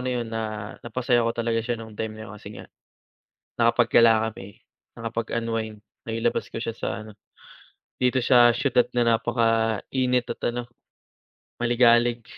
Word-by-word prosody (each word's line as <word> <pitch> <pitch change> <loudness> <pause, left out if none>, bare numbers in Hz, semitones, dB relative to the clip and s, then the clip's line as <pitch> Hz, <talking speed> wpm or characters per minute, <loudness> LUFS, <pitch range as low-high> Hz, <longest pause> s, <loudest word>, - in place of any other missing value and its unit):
na 130 0 -2
yun 120 -1 -3
na 115 - -2 0.4
napasaya 120 0 0
ko 115 - +1
talaga 115 -1 0
siya 120 +1 -2
nung 110 -1 -10
time 110 0 -5
na 110 - -8
yun, 110 - -10
kasi 105 -1 -11
nga - - -10 0.9
nakapaggala 115 -1 +4
kami, 100 -2 -12 0.4
nakapag-unwind, 115 -1 -3 0.2
nailabas 115 0 -2
ko - - -5
siya 115 0 -4
sa - - -4 0.2
ano, 110 - -12 0.9
dito 125 0 +2
sa 120 -2 +6
siyudad 125 -1 +2
na 115 -2 +3
napaka-init 115 +2 +1
at - - -7
ano, 120 0 -4 0.9
maligalig. 120 0 +3
115 Hz, 140 wpm, -25 LUFS, 115-120 Hz, 0.9 s, sa